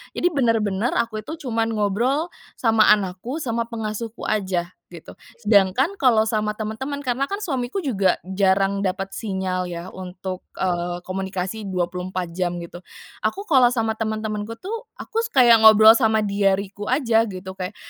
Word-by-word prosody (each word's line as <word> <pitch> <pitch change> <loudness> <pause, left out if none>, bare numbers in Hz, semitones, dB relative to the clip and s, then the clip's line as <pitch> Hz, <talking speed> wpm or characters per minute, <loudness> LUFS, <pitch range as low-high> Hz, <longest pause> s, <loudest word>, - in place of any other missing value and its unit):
Jadi, - - +2
benar-benar, 225 -3 +1
aku 230 -2 -1
itu 315 - -6
cuman 225 -1 0
ngobrol 240 - 0 0.3
sama 225 -2 +4
anakku, 205 - -5
sama 230 -1 -2
pengasuhku 225 0 -5
aja, 185 -4 -1 0.2
gitu. 170 -2 -13 0.2
Sedangkan, 220 - +2
kalau 230 -5 +4
sama 215 -1 -1
teman-teman, 265 +7 -4
karena 260 +1 -1
kan 400 +4 -4
suamiku 270 +1 -2
juga 200 - +2
jarang 195 +1 +1
dapat 195 0 -2
sinyal 190 -3 -3
ya, 175 0 -7
untuk, 185 0 -7
eee, 175 -1 -2
komunikasi 190 +2 -4
24 180 -1 -3
jam, 175 0 -2
gitu. 170 +1 -10 0.4
Aku, 395 - -2
kalau 265 -10 +5
sama 225 -2 -1
teman-temanku 215 0 -3
tuh, 445 - -6
aku 455 - -4 0.2
kayak 240 -3 +7
ngobrol 220 0 +9
sama 220 -2 +3
diariku 200 0 0
aja, 230 -4 +2
gitu, 190 -1 -7
kayak 190 +1 -6
215 Hz, 145 wpm, -22 LUFS, 190-235 Hz, 0.4 s, ngobrol